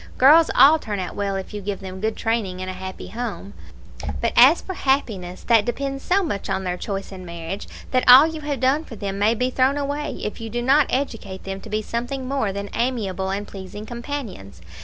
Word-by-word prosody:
Girls 305 Hz, +5 st, +7 dB
all 310 Hz, +3 st, +7 dB
turn 210 Hz, -7 st, -4 dB
out 180 Hz, -, -5 dB
well 200 Hz, -1 st, -1 dB
if 190 Hz, +2 st, -5 dB
you 205 Hz, -, -5 dB
give 200 Hz, 0 st, -4 dB
them 190 Hz, -1 st, -8 dB
good 220 Hz, 0 st, -1 dB
training 220 Hz, -5 st, -1 dB
in 185 Hz, -, -5 dB
a 185 Hz, -, -4 dB
happy 190 Hz, 0 st, -7 dB
home; 220 Hz, -3 st, -5 dB, 0.7 s
but -, -, 0 dB
as -, -, +7 dB
for 380 Hz, -, -6 dB
happiness, 220 Hz, -, -1 dB
that 230 Hz, -3 st, +4 dB
depends 275 Hz, +3 st, -3 dB
so 390 Hz, +2 st, +2 dB
much 200 Hz, -, -3 dB
on 190 Hz, 0 st, -1 dB
their 180 Hz, -1 st, -2 dB
choice 195 Hz, +2 st, -5 dB
in 185 Hz, -1 st, -9 dB
marriage, 170 Hz, +2 st, -6 dB, 0.2 s
that 255 Hz, -1 st, +2 dB
all 260 Hz, +4 st, +11 dB
you 320 Hz, -1 st, -4 dB
have 295 Hz, -2 st, -3 dB
done 265 Hz, +4 st, +2 dB
for 235 Hz, -, -10 dB
them 200 Hz, -1 st, -4 dB
may 215 Hz, +3 st, +3 dB
be 250 Hz, +2 st, 0 dB
thrown 265 Hz, +2 st, +2 dB
away, 290 Hz, +1 st, -3 dB
if 210 Hz, -, -4 dB
you 225 Hz, -, -5 dB
do 240 Hz, +2 st, -3 dB
not 275 Hz, +3 st, +4 dB
educate 225 Hz, -8 st, -3 dB
them 195 Hz, 0 st, -5 dB
to 220 Hz, -, -11 dB
be 215 Hz, +1 st, -1 dB
something 245 Hz, +4 st, -4 dB
more 270 Hz, -7 st, 0 dB
than 200 Hz, +1 st, -5 dB
amiable 205 Hz, -6 st, -1 dB
and 200 Hz, +2 st, -3 dB
pleasing 195 Hz, +2 st, -8 dB
companions. 235 Hz, -, -6 dB
220 Hz, 220 wpm, -22 LUFS, 195-265 Hz, 0.7 s, all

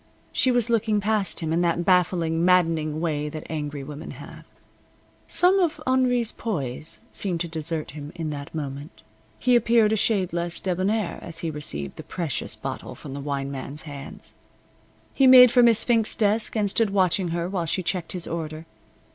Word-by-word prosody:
She 260 Hz, -, +2 dB
was 245 Hz, -2 st, +2 dB
looking 220 Hz, -2 st, +1 dB
past 205 Hz, -5 st, 0 dB
him 160 Hz, -1 st, -1 dB
in 170 Hz, -, +2 dB
that 170 Hz, 0 st, 0 dB
baffling, 170 Hz, -3 st, +2 dB
maddening 165 Hz, -4 st, +2 dB
way 150 Hz, -3 st, -1 dB
that 155 Hz, +1 st, -7 dB
angry 150 Hz, -2 st, -4 dB
women 150 Hz, +3 st, -8 dB
have. -, -, -11 dB, 0.8 s
Some 370 Hz, +2 st, +3 dB
of 335 Hz, -4 st, +1 dB
Henri's 250 Hz, -3 st, +2 dB
poise 155 Hz, -, -4 dB
seemed 180 Hz, -4 st, -1 dB
to 175 Hz, -, -1 dB
desert 160 Hz, -1 st, -3 dB
him 145 Hz, 0 st, -8 dB
in 160 Hz, -3 st, -4 dB
that 140 Hz, +1 st, -7 dB
moment. 140 Hz, 0 st, -6 dB, 0.3 s
He 250 Hz, -1 st, +3 dB
appeared 230 Hz, -2 st, +4 dB
a -, -, +3 dB
shade 200 Hz, -5 st, +1 dB
less 170 Hz, 0 st, -2 dB
debonair 190 Hz, +1 st, -1 dB
as 165 Hz, -1 st, -7 dB
he 160 Hz, -, -1 dB
received 75 Hz, -, -3 dB
the -, -, -7 dB
precious 170 Hz, -6 st, -3 dB
bottle -, -, -6 dB
from 140 Hz, -, -9 dB
the 140 Hz, -, -5 dB
wine 140 Hz, -1 st, -3 dB
man's 140 Hz, +2 st, -5 dB
hands. 145 Hz, -3 st, -8 dB, 0.8 s
He 270 Hz, -, +4 dB
made 250 Hz, -2 st, +9 dB
for 245 Hz, -, +5 dB
Miss 230 Hz, -2 st, +5 dB
Fink's 225 Hz, -3 st, +1 dB
desk 215 Hz, +1 st, +1 dB
and 210 Hz, -2 st, +1 dB
stood 215 Hz, +2 st, +1 dB
watching 190 Hz, -1 st, +2 dB
her 170 Hz, +1 st, -2 dB
while 180 Hz, -3 st, -2 dB
she 185 Hz, +3 st, -1 dB
checked 175 Hz, -1 st, -2 dB
his 180 Hz, -2 st, -2 dB
order. 160 Hz, -1 st, -5 dB
170 Hz, 180 wpm, -24 LUFS, 155-215 Hz, 0.8 s, made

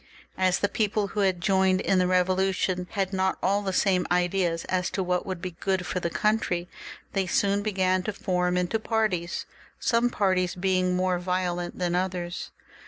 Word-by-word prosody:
As 185 Hz, 0 st, +3 dB
the 200 Hz, -, +1 dB
people 210 Hz, -1 st, 0 dB
who 210 Hz, -, -4 dB
had 190 Hz, -3 st, +2 dB
joined 190 Hz, -1 st, +3 dB
in 190 Hz, -1 st, +2 dB
the 180 Hz, -, +3 dB
Bevolution 185 Hz, 0 st, +1 dB
had 195 Hz, -2 st, -1 dB
not 190 Hz, 0 st, +1 dB
all 200 Hz, +2 st, +2 dB
the 195 Hz, -2 st, -2 dB
same 185 Hz, -1 st, +2 dB
ideas 175 Hz, -1 st, +1 dB
as 180 Hz, -1 st, 0 dB
to 190 Hz, -, -2 dB
what 180 Hz, +1 st, -1 dB
would 185 Hz, -2 st, -5 dB
be 185 Hz, -, -3 dB
good 185 Hz, +2 st, -2 dB
for 180 Hz, -, -2 dB
the 170 Hz, -, -2 dB
country, 180 Hz, -3 st, 0 dB, 0.5 s
they 195 Hz, -2 st, 0 dB
soon 200 Hz, +3 st, +2 dB
began 190 Hz, -3 st, +1 dB
to 215 Hz, -, -2 dB
form 180 Hz, -2 st, 0 dB
into 180 Hz, +5 st, 0 dB
parties, 215 Hz, -7 st, -1 dB, 0.3 s
some 235 Hz, 0 st, +2 dB
parties 185 Hz, -5 st, +1 dB
being 185 Hz, 0 st, +1 dB
more 180 Hz, -1 st, +1 dB
violent 180 Hz, -1 st, -2 dB
than 175 Hz, -1 st, -1 dB
others. 180 Hz, -1 st, -2 dB
185 Hz, 175 wpm, -26 LUFS, 180-195 Hz, 0.5 s, As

